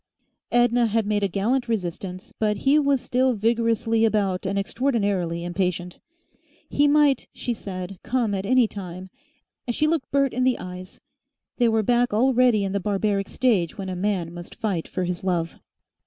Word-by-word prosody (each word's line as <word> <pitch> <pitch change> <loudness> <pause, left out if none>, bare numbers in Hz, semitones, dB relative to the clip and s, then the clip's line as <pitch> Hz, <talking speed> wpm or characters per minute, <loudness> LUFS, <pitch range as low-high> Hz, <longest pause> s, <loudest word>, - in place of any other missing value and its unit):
Edna 240 0 +3
had 225 0 0
made 205 0 0
a 200 - +2
gallant 230 +7 0
resistance, 185 -3 -4
but 210 -1 +1
he 285 +3 +5
was 280 -3 +2
still 255 +1 +1
vigorously 230 0 +1
about 200 -4 +1
and 200 +1 -1
extraordinarily 200 -7 -1
impatient. 180 0 -2 0.7
He 290 +1 +2
might, 290 -3 +3
she 245 - -3
said, 185 -3 -7
come 235 -4 0
at 190 -1 -2
any 250 +3 +3
time, 185 -2 -8 0.6
and 240 - -1
she 305 - +2
looked 310 -4 0
Bert 275 -1 +1
in 255 - 0
the 255 -1 +2
eyes. 185 0 -9 0.6
They 240 -2 +3
were 220 -1 +2
back 240 0 +2
already 245 -2 +3
in 195 - -2
the 200 - 0
barbaric 200 0 -1
stage 215 -9 +1
when 195 -2 -5
a 185 - -3
man 180 -3 -1
must 175 0 -10
fight 195 -7 -2
for 185 - -3
his 180 0 -3
love. 170 -3 -1
210 Hz, 170 wpm, -24 LUFS, 185-245 Hz, 0.7 s, he